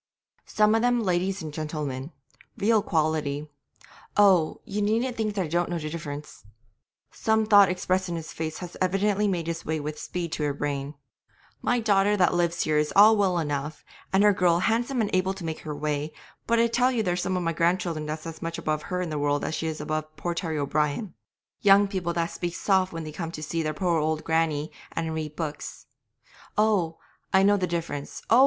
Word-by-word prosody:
Some 210 Hz, 0 st, +3 dB
of 225 Hz, -, +3 dB
them 245 Hz, -1 st, +2 dB
ladies 185 Hz, 0 st, 0 dB
and 155 Hz, -2 st, -6 dB
gentlemen, 150 Hz, -2 st, -4 dB, 0.5 s
real 215 Hz, +1 st, +3 dB
quality. 155 Hz, -5 st, 0 dB, 0.7 s
Oh! 190 Hz, -6 st, +4 dB
ye 210 Hz, +1 st, -3 dB
needn't 230 Hz, +4 st, +1 dB
think 215 Hz, -2 st, -2 dB
I 190 Hz, -, +1 dB
don't 175 Hz, +2 st, 0 dB
know 175 Hz, -, -1 dB
the 155 Hz, -2 st, -5 dB
difference' 150 Hz, -2 st, -7 dB, 0.7 s
(some 220 Hz, 0 st, +1 dB
thought 205 Hz, -3 st, +7 dB
expressed 185 Hz, 0 st, 0 dB
in 170 Hz, -, -2 dB
his 160 Hz, -1 st, -6 dB
face 160 Hz, -1 st, -4 dB
had 180 Hz, -1 st, -8 dB
evidently 200 Hz, +2 st, +2 dB
made 175 Hz, -4 st, -1 dB
its 165 Hz, 0 st, -3 dB
way 160 Hz, 0 st, -2 dB
with 150 Hz, +1 st, -5 dB
speed 175 Hz, -2 st, -4 dB
to 155 Hz, -, -2 dB
her 145 Hz, -1 st, -1 dB
brain) 145 Hz, 0 st, -3 dB, 0.7 s
'my 245 Hz, -1 st, +1 dB
daughter 205 Hz, -1 st, +3 dB
that 180 Hz, -2 st, +3 dB
lives 175 Hz, 0 st, +1 dB
here 155 Hz, -1 st, +2 dB
is 150 Hz, 0 st, 0 dB
all 215 Hz, +3 st, +8 dB
well 195 Hz, -4 st, +2 dB
enough, 150 Hz, -1 st, -3 dB, 0.3 s
and 190 Hz, +1 st, +4 dB
her 210 Hz, -1 st, +6 dB
girl 175 Hz, -2 st, +3 dB
handsome 235 Hz, +6 st, +1 dB
and 210 Hz, -, -1 dB
able 185 Hz, +1 st, +1 dB
to 185 Hz, -3 st, -7 dB
make 160 Hz, -1 st, -4 dB
her 150 Hz, -2 st, -6 dB
way, 150 Hz, +1 st, -2 dB, 0.4 s
but 235 Hz, -, +3 dB
I 230 Hz, -, +5 dB
tell 245 Hz, +2 st, +2 dB
you 235 Hz, -3 st, 0 dB
there's 180 Hz, -1 st, 0 dB
some 185 Hz, 0 st, -1 dB
of 180 Hz, -, -2 dB
my 165 Hz, 0 st, 0 dB
grandchildren 170 Hz, -2 st, 0 dB
that's 155 Hz, 0 st, -5 dB
as 165 Hz, -1 st, -7 dB
much 165 Hz, 0 st, -3 dB
above 155 Hz, 0 st, -1 dB
her 180 Hz, 0 st, -1 dB
in 170 Hz, -, -4 dB
the 150 Hz, -, -2 dB
world 145 Hz, 0 st, 0 dB
as -, -, -2 dB
she 160 Hz, -, -2 dB
is 155 Hz, -1 st, -3 dB
above 155 Hz, 0 st, -3 dB
poor 175 Hz, +3 st, -3 dB
Terry 165 Hz, -2 st, -3 dB
O'Brien 150 Hz, +6 st, -1 dB, 0.5 s
young 200 Hz, 0 st, +6 dB
people 185 Hz, -4 st, -2 dB
that 170 Hz, 0 st, -1 dB
speak 175 Hz, -1 st, -4 dB
soft 190 Hz, -2 st, +2 dB
when 165 Hz, -1 st, -5 dB
they 155 Hz, -, -6 dB
come 165 Hz, +1 st, -5 dB
to 155 Hz, -, -6 dB
see 165 Hz, +2 st, -2 dB
their 155 Hz, -1 st, -2 dB
poor 170 Hz, 0 st, +1 dB
old 155 Hz, 0 st, -1 dB
grannie 160 Hz, -2 st, 0 dB, 0.2 s
and 165 Hz, -1 st, -2 dB
read 155 Hz, -1 st, -4 dB
books, 155 Hz, -2 st, -5 dB, 0.7 s
oh! 200 Hz, -7 st, +2 dB, 0.3 s
I 190 Hz, 0 st, +5 dB
know 205 Hz, +1 st, +5 dB
the 185 Hz, -2 st, 0 dB
difference; 165 Hz, -4 st, -4 dB
oh! 235 Hz, -, +7 dB
170 Hz, 210 wpm, -26 LUFS, 155-195 Hz, 0.7 s, all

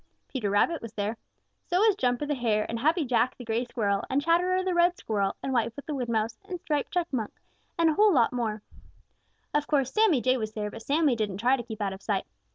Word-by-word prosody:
Peter 235 Hz, -7 st, -2 dB
Rabbit 250 Hz, +11 st, +2 dB
was 230 Hz, -1 st, -8 dB
there. 210 Hz, +1 st, -2 dB, 0.5 s
So 355 Hz, -, +1 dB
was 425 Hz, +1 st, +4 dB
Jumper 250 Hz, -4 st, 0 dB
the 295 Hz, -, -1 dB
Hare 225 Hz, -5 st, 0 dB
and 230 Hz, -, -3 dB
Happy 315 Hz, +5 st, +2 dB
Jack 245 Hz, 0 st, +1 dB
the 245 Hz, -, -9 dB
Gray 230 Hz, +2 st, -1 dB
Squirrel 205 Hz, -5 st, -1 dB
and 270 Hz, -, +2 dB
Chatterer 355 Hz, +4 st, +2 dB
the 370 Hz, -1 st, 0 dB
Red 345 Hz, +1 st, +3 dB
Squirrel 200 Hz, -3 st, -1 dB
and 270 Hz, -, -2 dB
Whitefoot 235 Hz, +3 st, -1 dB
the 305 Hz, -, -4 dB
Wood 250 Hz, -4 st, -3 dB
Mouse 225 Hz, 0 st, -1 dB
and 360 Hz, -2 st, -4 dB
Striped 295 Hz, 0 st, -2 dB
Chipmunk 330 Hz, -, -1 dB, 0.5 s
and 335 Hz, -1 st, +4 dB
a 310 Hz, -, +1 dB
lot 315 Hz, -, +4 dB
more. 220 Hz, -4 st, -2 dB, 0.9 s
Of 295 Hz, 0 st, +1 dB
course, 275 Hz, -4 st, +1 dB
Sammy 425 Hz, -, +4 dB
Jay 255 Hz, +2 st, +2 dB
was 215 Hz, -2 st, -4 dB
there, 210 Hz, -1 st, -3 dB
but 225 Hz, -, -9 dB
Sammy 290 Hz, +1 st, +2 dB
didn't 210 Hz, -4 st, -2 dB
try 245 Hz, +5 st, +3 dB
to 260 Hz, -, -4 dB
keep 220 Hz, -2 st, -8 dB
out 195 Hz, -1 st, -1 dB
of 190 Hz, -, -10 dB
sight. 200 Hz, -3 st, -1 dB
250 Hz, 225 wpm, -27 LUFS, 220-315 Hz, 0.9 s, was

